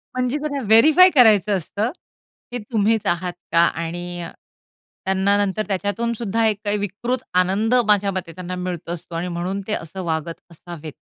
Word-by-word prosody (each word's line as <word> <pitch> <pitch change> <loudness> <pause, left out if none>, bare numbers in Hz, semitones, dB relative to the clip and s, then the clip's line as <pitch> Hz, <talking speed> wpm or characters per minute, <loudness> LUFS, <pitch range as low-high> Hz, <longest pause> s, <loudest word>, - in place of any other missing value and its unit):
म्हणजे, 255 +2 0
त्यांना 290 -2 -3
व्हेरिफाय 310 - +7
करायचं 215 -5 +5
असतं 205 +7 -3 0.6
की 245 - -3
तुम्हीच 220 -1 +1
आहात 175 0 -1 0.2
का? 165 - +1
आणि 175 +1 -1 0.8
त्यांना 190 +1 +2
नंतर 205 +2 -2
त्याच्यातून 205 +4 -1
सुद्धा 225 0 -1
एक 215 -2 0
काही 205 0 +1
विकृत 220 +6 -3
आनंद, 190 +6 +2
माझ्या 205 -1 +3
मते, 185 -3 -4
त्यांना 180 +2 -6
मिळत 180 -2 -5
असतो 170 0 -6
आणि 170 +2 -2
म्हणून 180 +3 -3
ते 215 - -1
असं 185 +1 -5
वागत 165 0 -3
असावेत. 165 -2 -9
195 Hz, 155 wpm, -21 LUFS, 175-220 Hz, 0.8 s, व्हेरिफाय